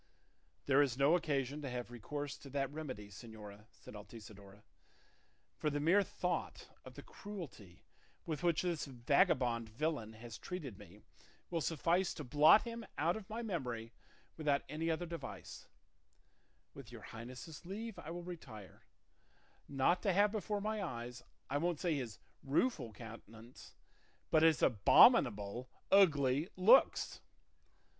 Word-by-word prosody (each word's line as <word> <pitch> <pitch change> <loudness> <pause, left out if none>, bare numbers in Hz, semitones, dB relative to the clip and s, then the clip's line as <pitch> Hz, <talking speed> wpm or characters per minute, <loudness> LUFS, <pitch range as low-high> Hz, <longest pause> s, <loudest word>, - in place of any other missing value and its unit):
"There 140 +1 +5
is 130 -4 +1
no 140 +5 +5
occasion 145 -4 -1
to 140 - -4
have 125 -1 -5
recourse 145 +4 -5
to 140 - -11
that 135 0 -2
remedy, 130 -10 -6
señora," 105 -1 -11
said - - -14
Altisidora; 105 -1 -12 1.0
"for 150 - +1
the 145 0 -2
mere 170 +7 +4
thought 180 -2 -3
of - - -12
the - - -9
cruelty 150 - -10 0.4
with 155 -4 -3
which 170 -1 +2
this 170 -4 -1
vagabond 125 - +1
villain 115 -2 -2
has 110 -1 -10
treated 140 - -6
me 105 +1 -14 0.5
will 165 -2 0
suffice 170 +4 +1
to 150 - -6
blot 150 - +6
him 235 -1 -6
out 170 +2 +1
of 215 -3 -8
my 225 +2 -4
memory 125 - -4 0.5
without 145 -3 +1
any 160 +2 -2
other 165 +2 -1
device; 170 -1 -8 1.1
with 135 -4 -11
your 115 -2 -10
highness's 125 +7 -9
leave 210 +4 -6
I 155 - -8
will 175 +1 -6
retire, 135 - -10 0.9
not 140 +6 +2
to 195 -4 +1
have 205 +2 +4
before 210 -1 -2
my 215 0 -2
eyes, 120 -7 -5 0.3
I 140 +2 -1
won't 170 -1 -1
say 175 -3 0
his 120 -9 -4 0.2
rueful 140 - 0
countenance, 115 +2 -12 0.6
but 155 - +5
his 160 -1 +4
abominable, 120 - +5 0.2
ugly 150 -6 +4
looks." 215 +8 +5
145 Hz, 140 wpm, -36 LUFS, 120-175 Hz, 1.1 s, blot